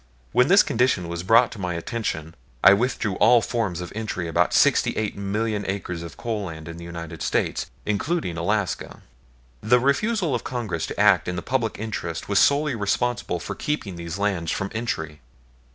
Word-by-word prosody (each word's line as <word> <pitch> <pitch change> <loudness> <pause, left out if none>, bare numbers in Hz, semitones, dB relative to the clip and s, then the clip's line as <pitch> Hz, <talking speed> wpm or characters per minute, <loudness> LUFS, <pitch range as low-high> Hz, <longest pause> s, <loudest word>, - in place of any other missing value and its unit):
When 125 +2 +4
this 195 +5 +7
condition 115 -7 +1
was 85 0 -3
brought 115 +6 +5
to 110 - -9
my 90 -2 -2
attention 85 -4 -4 0.3
I 95 - +9
withdrew 115 0 0
from 95 - -6
all 115 +3 +7
forms 105 -8 -2
of 90 - -7
entry 105 -5 -3
about 80 - +2
sixty - - +4
eight 110 -1 -1
million 105 +1 -2
acres 95 -3 -3
of 85 - -9
coal 110 -4 -3
land 80 -2 -8
in 85 0 -7
the 85 - -9
United 85 -1 -7
States, - - -1 0.2
including 105 - -1
Alaska. 100 +3 -2 0.6
The 125 +3 +4
refusal 170 - +1
of 120 - -1
Congress 110 -11 -3
to - - -6
act 105 -3 +5
in 90 - -2
the 85 - -4
public 120 -4 -1
interest 95 -7 -4
was 100 -1 +3
solely 145 0 +3
responsible 110 -2 -1
for 95 +4 -5
keeping 105 - -3
these 85 +1 -5
lands 95 -5 -1
from 95 - -2
entry. 80 -10 -3
100 Hz, 185 wpm, -24 LUFS, 85-120 Hz, 0.6 s, I